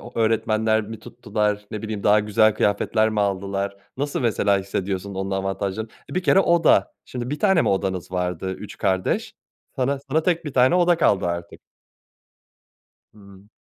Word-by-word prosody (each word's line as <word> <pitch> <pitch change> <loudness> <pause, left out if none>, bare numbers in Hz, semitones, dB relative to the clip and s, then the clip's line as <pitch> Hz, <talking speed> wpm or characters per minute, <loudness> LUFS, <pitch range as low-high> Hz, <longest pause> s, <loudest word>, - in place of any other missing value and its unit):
o 120 - -11
öğretmenler 110 -1 +1
mi 110 +1 -8
tuttular, 105 -3 -2
ne 105 - -5
bileyim, 110 -2 -4
daha 105 +2 +5
güzel 105 +1 +3
kıyafetler 110 +2 +1
mi 105 - -1
aldılar? 100 0 -2 0.2
Nasıl 145 +2 -2
mesela 105 -4 +2
hissediyorsun 95 0 -4
onun 95 +1 -3
avantajlarını? 95 +2 -3 0.2
Bir 185 - -1
kere 190 - +5
oda. 170 -3 +3
Şimdi, 125 0 -6
1 150 - -3
tane 190 -5 +3
mi - - +1
odanız 95 -2 -2
vardı 90 0 -2
3 - - -9
kardeş? 95 -1 -1 0.4
Sana 135 +2 0
sana 160 +3 +2
tek 170 -1 0
bir 150 - -5
tane 130 +6 +4
oda 175 -1 +4
kaldı 100 - +2
artık. 85 0 -5 1.5
Hımm. 100 -1 -17
105 Hz, 160 wpm, -23 LUFS, 95-125 Hz, 1.5 s, daha